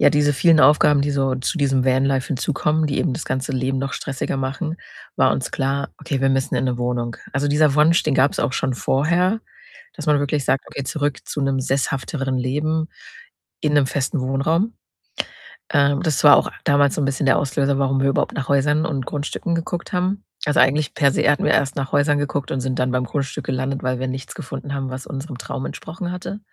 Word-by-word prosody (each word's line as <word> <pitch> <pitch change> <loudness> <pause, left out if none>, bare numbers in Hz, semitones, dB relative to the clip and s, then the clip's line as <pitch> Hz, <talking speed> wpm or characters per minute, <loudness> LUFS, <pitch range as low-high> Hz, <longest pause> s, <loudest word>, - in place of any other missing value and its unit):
ja, - - +6
diese 145 -1 +2
vielen 165 +2 +5
Aufgaben, 150 -1 +5
die 145 +1 0
so 135 -2 +1
zu 130 +6 -2
diesem 135 -3 +2
Vanlife 130 0 +2
hinzukommen, 150 +2 0
die 140 - -1
eben 150 -7 0
das 160 - -5
ganze 130 +2 -2
Leben 130 +1 -1
noch 135 0 -3
stressiger 135 0 -3
machen, 140 +5 -3 0.4
war - - +4
uns 130 - -2
klar: 135 0 -1
„Okay, 135 -3 -3
wir 135 - +3
müssen 135 -1 0
in - - 0
'ne 125 -1 0
Wohnung.“ 120 -1 -2 0.2
Also, 140 +2 0
dieser 150 -1 +3
Wunsch, 155 +3 +4
den 150 - 0
gab's 135 +2 +2
auch 130 - 0
schon 130 - -1
vorher, 175 - +1 0.5
dass - - -7
man 150 -1 +4
wirklich 145 -1 -1
sagt: 135 - +1
„Okay, 140 - -6
zurück 145 0 -2
zu 150 - -4
'nem 135 -1 +1
sesshafteren 135 0 -1
Leben 150 +5 -1 0.7
in 150 - 0
'nem 145 -2 +4
festen 135 +2 -1
Wohnraum.“ 155 - 0 1.0
Äh, 140 -2 +3
das 155 -4 0
war 145 -1 +9
auch - - 0
damals 145 -1 +3
so - - -1
'n - - +2
bisschen 135 +1 -1
der 130 - +5
Auslöser, 140 0 0
warum 135 -1 +1
wir 135 - +3
überhaupt 135 - 0
nach 135 - -4
Häusern 145 +3 +2
und 135 -4 -3
Grundstücken 150 +5 -3
geguckt 170 +3 -4
haben. 185 +3 0 0.2
Also, 145 +1 +2
eigentlich 145 +2 +2
per 140 -3 +3
se - - +2
hatten 145 - +2
wir - - +3
erst 135 -1 +1
nach 135 -1 -3
Häusern 145 0 +3
geguckt 145 -1 -2
und 130 - -1
sind 130 0 -2
dann 125 0 +1
beim 125 0 0
Grundstück 135 +2 -3
gelandet, 130 +1 -2
weil 130 0 -1
wir 130 - -2
nichts 130 0 -5
gefunden 140 +1 -6
haben, 135 -1 -3
was 130 +1 -6
unserem 135 0 -6
Traum 130 - -5
entsprochen 175 +2 -6
hatte. 180 +3 -6
140 Hz, 215 wpm, -21 LUFS, 135-150 Hz, 1.0 s, war